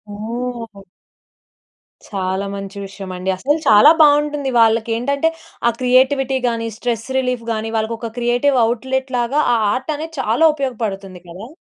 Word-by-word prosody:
ఓహ్! 230 -1 -6 1.3
చాలా 190 -1 -2
మంచి 195 0 -7
విషయమండి. 190 -1 -6
అసల 275 +10 0
చాలా 215 +8 +8
బావుంటుంది. 295 -1 +3
వాళ్ళకేంటంటే, 230 +7 +2 0.4
ఆ - - +6
క్రియేటివిటీ 260 +1 +2
గాని, 230 -1 -2
స్ట్రెస్ 235 -2 -3
రిలీఫ్ 250 -2 -2
గాని, 220 0 -3
వాళ్ళకొక 225 +1 -3
క్రియేటివ్ 245 +3 +1
అవుట్‌లెట్ 260 +3 -2
లాగా 240 +5 0
ఆ - - +3 0.2
ఆర్టనేది 310 +4 -4
చాలా 240 +7 +2
ఉపయోగపడుతుంది 210 -9 -4
కదా! 190 +6 -9
235 Hz, 120 wpm, -18 LUFS, 215-265 Hz, 1.3 s, చాలా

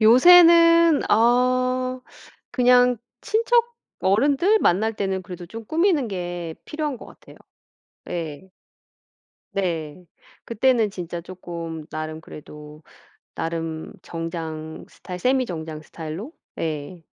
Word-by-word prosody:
요새는 335 +6 +7
어 255 +2 +2 0.5
그냥 250 -1 +4 0.2
친척 470 +2 +1 0.3
어른들 285 - +3
만날 215 +6 +2
때는 190 -2 -2
그래도 175 -1 -9
좀 225 +5 -9
꾸미는 320 - +1
게 175 -4 -5
필요한 300 -3 -3
것 - - -12
같아요. - - -16 0.7
예. 165 +1 -5 1.1
네. 175 -3 -3 0.4
그때는 230 -1 +2
진짜 175 -2 -6
쪼끔 170 -3 -7
나름 155 0 -5
그래도 150 -1 -12 0.5
나름 165 -1 -4
정장 160 -2 -6
스타일 180 -1 -9
세미 255 +3 +2
정장 160 -4 -6
스타일로? 165 - -8 0.3
예. 160 +2 -4
190 Hz, 210 characters per minute, -23 LUFS, 165-255 Hz, 1.1 s, 요새는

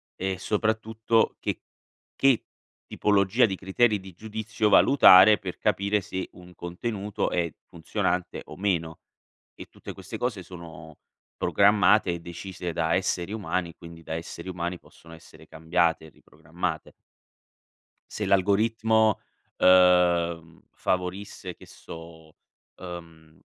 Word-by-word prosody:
e 95 0 -3
soprattutto 110 +2 0
che - - -4 0.5
che, 135 -4 +3 0.4
tipologia 105 +4 +2
di 95 -4 -2
criteri 105 +3 +1
di 95 -1 -12
giudizio 110 +2 -2
valutare 105 -3 +7
per 90 -2 -7
capire 100 +1 0
se 95 -1 -5
un 90 0 -15
contenuto 100 +4 -4
è 85 -2 -1
funzionante 90 +2 -3
o - - -11
meno. 85 -5 -1 0.6
E - - -11
tutte - - -10
queste - - -8
cose 115 -6 -2
sono 85 -3 -12 0.4
programmate 100 -1 +3
e 85 - -5
decise 85 +1 -7
da 80 +1 0
esseri 95 0 -1
umani, 90 -5 -3
quindi 85 -1 -13
da 80 - -5
esseri 85 +2 -7
umani 90 -1 -4
possono 85 0 -17
essere 80 - -16
cambiate 80 0 0
e - - -14
riprogrammate. 80 +2 -6 1.2
Se - - -4
l'algoritmo, 110 +3 +2 0.4
uhm, 85 -3 +3
favorisse 90 0 -4
che - - -16
so, 80 -1 -12 0.5
uhm 85 -3 -11
90 Hz, 115 wpm, -26 LUFS, 85-105 Hz, 1.2 s, valutare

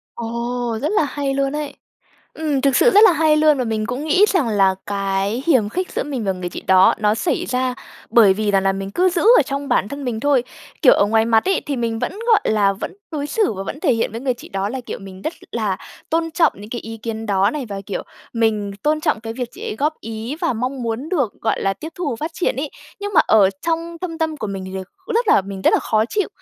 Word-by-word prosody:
Ồ, 235 0 -3
rất 300 - 0
là 420 - +3
hay 280 0 -2
luôn 275 0 0
ấy! 295 -2 -4 0.6
Ừm, 300 -4 -1
thực 275 -2 +2
sự - - +5
rất 420 -1 +7
là 370 - +7
hay 310 -1 +3
luôn! 305 -2 +4
Và 255 - 0
mình 220 -2 -2
cũng 255 +4 -4
nghĩ 340 +7 +4
rằng 330 - +1
là 195 -3 +3
cái 200 +3 -1
hiềm 255 -11 +3
khích 365 - -3
giữa - - -1
mình 265 -7 -4
và 195 - +1
người 180 -1 -5
chị - - -7
đó 190 0 +5
nó 210 0 +2
xảy 225 - -1
ra 250 0 0 0.4
bởi 220 -5 +6
vì 210 +1 0
rằng 195 -1 +3
là 195 - +2
mình 195 0 -5
cứ 365 - +2
giữ 350 -2 0
ở 485 +3 +7
trong 280 0 -4
bản 200 - +1
thân 280 +3 -6
mình 235 -3 -2
thôi. 280 -2 +3 0.4
Kiểu - - +8
ở 200 - +3
ngoài 220 +1 +3
mặt 225 -1 +3
ấy 385 - +1
thì 285 - -2
mình 230 -2 -1
vẫn, - - -2
gọi 450 -3 +5
là, 205 -2 +3
vẫn 195 - -6 0.2
đối 290 -2 -3
xử 415 - +1
và 195 -1 -5
vẫn 285 - -6
thể 305 -7 +3
hiện 225 -2 -1
với 230 - -5
người 255 -1 0
chị 240 - -13
đó 195 +1 -2
là, 260 +4 -4
kiểu, 245 - -7
mình 190 -1 -11
rất 315 - -2 0.2
là 215 -5 -1 0.3
tôn 330 0 0
trọng 325 +1 +3
những 205 +2 -11
cái 240 - -4
ý 225 +1 -8
kiến 225 0 -5
đó 195 -1 +2
này, 295 -4 -4
và, 200 -1 -5
kiểu, 200 - -3 0.3
mình 215 -3 0
tôn 305 +1 +1
trọng 305 -8 0
cái 225 0 -5
việc 245 0 -4
chị - - -11
ấy - - -4
góp 295 +6 +1
ý 225 +6 -5
và - - +1
mong 250 +3 -3
muốn 230 +5 -3
được, 275 - 0
gọi 225 - 0
là, 195 - +1
tiếp 310 - -7
thu 340 -6 -2
và 235 - -3
phát 315 +2 -2
triển 355 - 0
ấy. 280 +2 -3 0.3
Nhưng 410 0 -4
mà - - +8
ở 205 -3 +5
trong 335 0 -2
thâm 335 -3 -5
tâm 320 -1 -1
của 220 - -4
mình 195 -2 -5
thì 190 - -8
đ - - -3 0.3
cũng - - -3
rất 465 -1 +1
là - - +5
mình 195 0 -7
rất - - +4
là - - +4
khó 215 -1 +1
chịu 410 - -1
240 Hz, 270 wpm, -20 LUFS, 210-300 Hz, 0.6 s, Kiểu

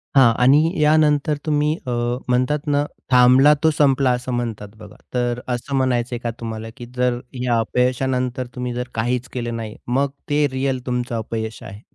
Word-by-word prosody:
हां 130 -4 +7
आणि 135 +4 +6 0.2
या 150 +1 +5
नंतर 150 -1 +2
तुम्ही 150 0 +1
अ, - - -1 0.4
म्हणतात 130 +5 +1
ना 145 0 +2 0.3
"थांबला 130 +3 +6
तो 160 - +5
संपला", 140 -3 +3
असं 125 +1 -4
म्हणतात 115 -4 -3
बघा. 105 -1 -13 0.2
तर 120 -1 0
असं 125 +2 -3
म्हणायचंय 125 -2 0
का 120 -1 -3
तुम्हाला 115 -1 -6
की 120 - -8
जर 125 -1 +1 0.2
या 120 -2 +2
अपयशानंतर 125 +1 0
तुम्ही 125 -1 -3
जर 125 +1 -4
काहीच 120 +3 -1
केलं 120 -2 -3
नाही, 110 -2 -6
मग 135 +3 +1 0.2
ते 145 0 +3
रिअल 130 0 -1
तुमचं 125 -1 -2
अपयश 110 0 -4
आहे? 100 +2 -10
125 Hz, 170 wpm, -21 LUFS, 120-135 Hz, 0.4 s, हां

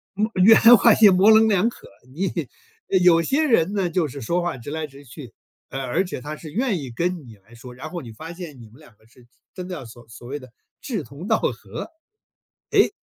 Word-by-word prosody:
嗯， 210 +3 0
圆 220 +3 +8 0.2
滑 - - +5
也 210 -3 +7
模 190 +3 +5
棱 220 0 +6
两 200 +2 +2
可， - - -15 0.2
你 190 +5 -3 0.4
呃， 190 - +3
有 175 -2 +5
些 280 - 0
人 200 - +2
呢， 190 -4 0
就 165 -1 0
是 140 0 -9
说 170 +10 -1
话 175 -3 -3
直 125 +4 -9
来 160 -1 -4
直 140 +1 -16
去， 125 -1 -12 0.4
啊， 135 0 -5
而 155 +9 -1
且 175 - -7
他 150 +3 -7
是 155 -3 -10
愿 230 -6 0
意 130 -4 -7
跟 175 +3 -3
你 110 - -13
来 110 +5 -20
说， 125 +1 -12
然 145 +5 -8
后 175 -1 -6
你 115 -4 -11
发 160 +8 -9
现 165 -7 -10
你 110 - -13
们 120 - -19
两 150 -9 -19
个 110 - -28
是 120 +2 -22
是 - - -25 0.3
真 180 -1 -7
的 185 - -5
要 160 - -8
所 115 +1 -14
所 115 +1 -13
谓 145 +2 -5
的 130 -3 -15 0.3
志 215 - -4
同 145 +9 -10
道 - - +2
合。 - - -5 0.8
诶， - - +4
160 Hz, 260 characters per minute, -22 LUFS, 130-185 Hz, 0.8 s, 圆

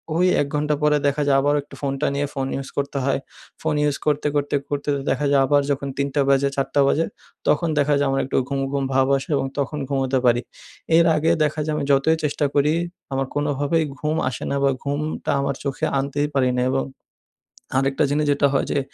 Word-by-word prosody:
ওই 175 +2 +3 0.2
১ 145 - -1
ঘণ্টা 150 0 +1
পরে 150 0 +4
দেখা 140 +1 0
যায় 135 -1 +4
আবারও 145 +1 +2
একটু - - -14
ফোনটা 135 +1 -1
নিয়ে 145 +1 0
ফোন 135 -1 -2
ইউজ 135 -1 -5
করতে 140 0 -2
হয়। 135 - +1 0.4
ফোন 160 -1 0
ইউজ 145 -1 +1
করতে, 150 0 +1
করতে, 145 0 0
করতে 145 0 -2 0.2
দেখা 150 - 0
যায় 140 - +5
আবার 145 +1 +3
যখন 140 0 -2
৩ঃ০০ 140 +1 0
বাজে, 140 0 +3
৪ঃ০০ 140 +1 +1
বাজে 165 +3 +2 0.4
তখন 165 +3 +2
দেখা 145 +1 +3
যায় 145 - +2
আমার 135 0 +1
একটু 135 - -1
ঘুম, 140 - -1
ঘুম 140 -1 -1
ভাব 130 0 +3
আসে 135 - -8
এবং - - -1
তখন 140 +2 -2
ঘুমোতে 135 -1 0
পারি। 120 0 +4 0.6
এর 170 - +5
আগে 160 +2 +2
দেখা 150 +1 -1
যায় 155 - -1
আমি 150 - -2
যতই 140 +4 +3
চেষ্টা 150 0 0
করি 145 +2 +3 0.4
আমার 135 0 0
কোনোভাবেই 145 +2 +1 0.2
ঘুম 155 +1 -1
আসে 125 - -6
না 140 - 0
বা 140 - +4
ঘুমটা 145 +2 -2
আমার 140 -1 -1
চোখে 140 -2 -2
আনতেই 145 +2 -1
পারি 130 -2 +3
না। 125 - +2
এবং 135 0 0 0.9
আরেকটা 135 0 +1
জিনিস 150 +1 +1
যেটা 140 0 +3
হয় 135 - +1
যে, - - +1
140 Hz, 210 wpm, -22 LUFS, 135-150 Hz, 0.9 s, যায়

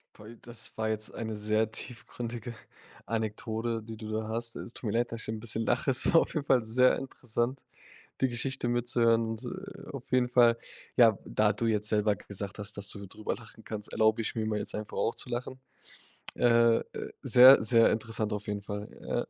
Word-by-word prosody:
Toll, 110 +2 -12
das 120 -1 -8
war 110 0 -1
jetzt 110 0 -3
eine 110 -1 -4
sehr 110 +1 0
tiefgründige 120 -1 -5 0.5
Anekdote, 110 +1 -2
die 110 0 -9
du 110 0 -7
da 110 0 -2
hast. 115 +1 0
Es - - -7
tut - - -13
mir 110 - 0
leid, 120 - -1
dass 115 0 -5
ich - - -6
'n 110 0 -3
bisschen 115 0 0
lache, - - +1
es 130 - +5
war 165 - +7
auf - - -4
jeden 150 -2 -1
Fall 125 -4 +3
sehr 125 +3 +3
interessant, 125 0 -3 0.6
die 130 - +4
Geschichte 125 +1 -1
mitzuhören 120 -1 +2
und, 115 +2 -5
äh, 190 +7 -8
auf 135 -3 -9
jeden 125 -1 +3
Fall 120 -2 +5 0.4
ja, 115 -4 +6
da 105 0 +2
du 115 - -1
jetzt 105 -1 0
selber 105 -1 +2
gesagt 100 +1 -5
hast, 105 -1 -2
dass 100 -1 -1
du 100 0 -8
drüber 105 +3 -4
lachen 115 -1 -13
kannst, 105 -2 -6
erlaube 110 +1 +3
ich 110 - -3
mir 110 -1 -2
mal 105 -1 -1
jetzt - - -3
einfach 105 0 -6
auch - - +1
zu - - -4
lachen. 125 +2 -4 0.8
Äh 115 -1 +4
äh, - - -5 0.4
sehr, 130 0 +8
sehr 115 +1 +5
interessant 110 -1 -1
auf 105 0 -6
jeden 105 -1 -3
Fall. 105 +1 -6
Ja. - - -2
115 Hz, 205 wpm, -29 LUFS, 110-120 Hz, 0.8 s, sehr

